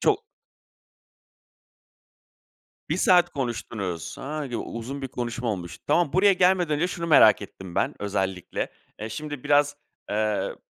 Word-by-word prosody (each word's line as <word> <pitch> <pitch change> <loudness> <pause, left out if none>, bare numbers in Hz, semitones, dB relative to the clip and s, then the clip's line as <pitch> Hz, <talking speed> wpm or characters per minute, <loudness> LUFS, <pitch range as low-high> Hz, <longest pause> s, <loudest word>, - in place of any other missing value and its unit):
Çok - - +2 2.7
1 160 - 0
saat 180 -1 +5
konuştunuz. 105 - -4
A, 150 +1 -4
u - - -1 0.2
uzun 135 +5 -6
bir 135 - -3
konuşma 120 -1 -4
olmuş. 85 -4 -6
Tamam, 150 0 +2
buraya 195 +2 +5
gelmeden 180 -3 +3
önce 165 +5 +1
şunu 170 -2 -4
merak 110 -10 +7
ettim 95 -3 -9
ben, - - +1
özellikle. 95 -3 -2 0.3
Eee, 110 +1 -5
şimdi 145 +3 -6
biraz, 145 0 +3 0.3
eee, 105 0 0
135 Hz, 130 wpm, -25 LUFS, 105-155 Hz, 2.7 s, merak